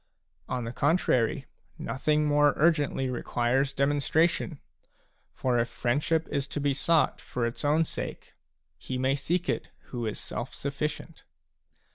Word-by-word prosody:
On 125 -1 -1
the 115 - -4
contrary, 135 -5 +2 0.3
nothing 150 +3 0
more 145 -1 +4
urgently 150 -4 +2
requires 125 +2 0
demonstration; 145 +3 +1 0.7
for 125 -2 0
if 120 0 0
friendship 145 +7 0
is 140 -1 -1
to 145 - -4
be 140 -1 +1
sought 160 +4 +2
for 120 -2 -2
its 115 +5 -4
own 150 +3 +4
sake, - - -6 0.5
he 130 - -4
may 130 +1 +2
seek 165 +6 -1
it - - -1 0.2
who 120 -3 -2
is 105 - -3
self 120 - -5
sufficient. 150 +3 -4
140 Hz, 135 wpm, -28 LUFS, 125-150 Hz, 0.7 s, more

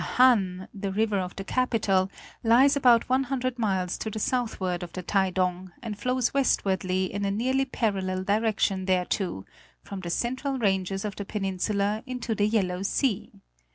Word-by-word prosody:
The - - -4
Han, 195 -8 +4
the 200 -1 -4
river 210 0 +1
of 180 0 -4
the 195 - -5
capital, 200 -5 +1 0.3
lies 250 +5 +5
about 245 -4 +4
one 260 +1 +2
hundred 255 -1 -2
miles 190 -5 0
to 220 - -3
the 215 - -6
southward 210 -7 -1
of 175 - -6
the 185 - -5
Taidong, 185 -1 0
and 220 -3 -4
flows 250 +4 0
westwardly 190 -8 +1
in 200 0 -2
a 200 - +1
nearly 260 +6 +1
parallel 190 -7 -1
direction 205 -2 +1
thereto, 180 - 0 0.4
from 200 - -7
the 175 -2 -6
central 260 +8 -1
ranges 195 -3 0
of 205 -2 -4
the 205 - -4
peninsula 200 +1 -1
into 250 -2 -3
the 205 -1 +1
Yellow 190 -4 0
Sea. 205 +2 -1
205 Hz, 165 wpm, -27 LUFS, 190-240 Hz, 0.4 s, lies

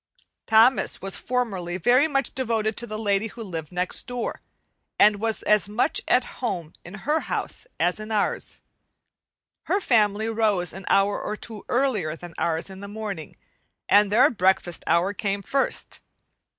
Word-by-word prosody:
Thomas 225 +4 +4
was 195 0 -5
formerly 195 -9 -2
very 250 - +4
much 275 -4 -1
devoted 225 -4 -1
to 240 - -3
the 215 -1 -5
lady 205 0 +1
who 230 +1 -9
lived 165 -6 -6
next 180 +6 -1
door, 245 -1 -4 0.6
and 210 0 +6
was 220 +1 -2
as 210 -1 +3
much 215 +4 +1
at 250 0 +3 0.2
home 175 -10 -3
in 175 +3 -10
her 305 +3 +2
house - - -4
as 180 +3 +1
in 215 +1 -7
ours. 210 -2 -1 1.0
Her 395 - +1
family 215 - +2
rose 215 -5 0
an 195 +1 -9
hour 200 +1 +3
or 215 - -4
two 220 -2 -9
earlier 225 - +1
than 175 0 -10
ours 165 -1 -1
in 190 -1 -10
the 200 - -8
morning, 205 -6 -6 0.5
and 205 0 +5
their 235 +5 +6
breakfast 185 -4 +1
hour 170 +4 +2
came 200 -1 -2
first. 275 +5 -1
210 Hz, 160 wpm, -25 LUFS, 190-230 Hz, 1.0 s, and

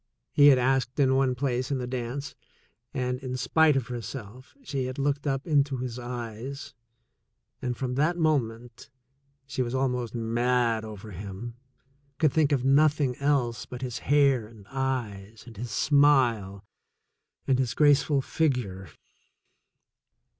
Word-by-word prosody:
he 145 -1 +7
had 140 -3 +7
asked 130 +1 0
in 135 -2 +4
one 135 -1 +2
place 125 -1 -1
in 140 - 0
the 125 - -3
dance, 130 +3 -4 0.6
and, 125 -2 -2
in 130 -1 -4
spite 160 +2 +3
of 135 -3 0
herself, 120 - -8
she 135 - -3
had 130 +1 -5
looked 140 +1 -1
up 135 0 -1
into 145 -4 +2
his 125 -1 -5
eyes, 125 +3 -6 0.9
and 125 -2 -3
from 130 -2 -3
that 155 +6 +1
moment 120 -8 -1 0.6
she 135 -1 -3
was 120 0 -2
almost 125 -3 -1
mad 115 0 +1
over 110 -1 -9
him, 100 +5 -7 0.6
could 155 -4 +2
think 155 -2 +2
of 130 -3 +1
nothing 140 -1 +3
else 140 -5 0
but 125 +1 -7
his 125 -2 -4
hair 140 -5 +3
and 110 -3 -16
eyes 115 -6 -3
and 115 -2 -12
his 120 +3 -5
smile 120 -7 +2 0.8
and 130 -1 +2
his 130 -3 -1
graceful 145 -1 +3
figure. 115 - -1
130 Hz, 140 wpm, -27 LUFS, 120-140 Hz, 0.9 s, he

